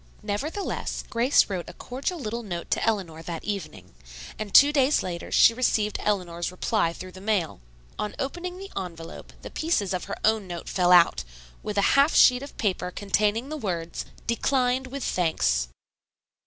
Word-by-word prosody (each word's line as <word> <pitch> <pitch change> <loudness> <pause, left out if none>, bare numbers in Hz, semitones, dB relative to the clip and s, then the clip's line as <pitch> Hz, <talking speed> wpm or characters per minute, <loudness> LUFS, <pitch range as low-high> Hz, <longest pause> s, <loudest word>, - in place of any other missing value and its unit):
Nevertheless, 285 - -3
Grace 245 +4 +4
wrote 185 -4 -4
a - - -10
cordial 275 +8 -4
little 235 -4 -4
note 175 -6 -6
to - - +1
Eleanor 185 -8 -1
that 165 0 -6
evening, 155 - -6 0.5
and 215 -2 -4
two 285 +6 +7
days 280 0 +3
later 175 -2 -5
she - - +6
received 220 -3 0
Eleanor's 180 -4 -1
reply 185 -1 0
through 185 +2 -9
the 185 - -12
mail. 195 - -1 0.4
On 210 - -3
opening 350 +6 -4
the 390 +1 -9
envelope 170 -4 -7
the - - -8
pieces 215 - 0
of 180 - -3
her 200 - -5
own 220 -2 +2
note 175 -2 -7
fell 180 -1 +2
out, 175 -1 +6 0.4
with 210 -1 -5
a 200 - +3
half 280 +3 +4
sheet 250 0 +6
of 280 - -10
paper 185 -4 -1
containing 210 +6 0
the 310 - -4
words, 170 - -4 0.2
"Declined 255 +2 +1
with 275 +1 -6
thanks." 60 - +1
210 Hz, 170 wpm, -26 LUFS, 180-255 Hz, 0.5 s, two